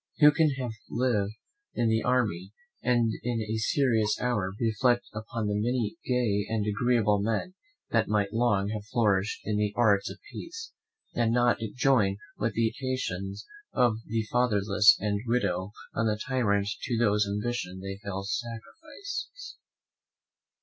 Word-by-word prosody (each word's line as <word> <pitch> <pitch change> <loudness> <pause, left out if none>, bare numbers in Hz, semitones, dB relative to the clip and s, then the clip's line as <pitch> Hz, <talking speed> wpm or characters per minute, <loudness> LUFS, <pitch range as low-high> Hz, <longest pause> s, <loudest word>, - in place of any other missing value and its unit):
Who 150 -1 +8
can 155 +1 +3
have 125 -3 -3 0.2
lived 110 -5 0 0.4
in 115 -1 +2
an 110 0 +2
army, 105 -7 0 0.3
and 120 -2 +2
in 120 0 -1
a 110 0 -2
serious 110 -2 +2
hour 105 -7 0
reflect 120 +1 +2
upon 110 +1 -4
the 105 - 0
many 120 +6 -1
gay 115 -5 +1
and 110 -2 0
agreeable 105 -1 +2
men 110 - -1 0.4
that 115 -1 +2
might 105 -1 0
long 105 -4 +2
have 105 -1 -5
flourished 105 -3 +1
in 105 -1 0
the 105 -1 +1
arts 100 -3 +3
of - - -8
peace, 455 0 -8 0.4
and 115 -1 +1
not 120 0 +3 0.2
join 120 -7 +3 0.2
with 115 - -2
the 115 -1 +2
imprecations 100 -7 -3 0.3
of 120 -3 +3
the 115 +1 0
fatherless 105 -4 +4
and 100 -1 -1
widow 100 -6 0 0.2
on 115 +1 0
the 105 -1 +1
tyrant 105 -4 0
to 120 - -1
whose 105 -3 +3
ambition 100 -3 -3
they 95 0 -6
fell 100 -1 -4
sacrifices? 300 - -6
110 Hz, 145 wpm, -28 LUFS, 100-120 Hz, 0.4 s, Who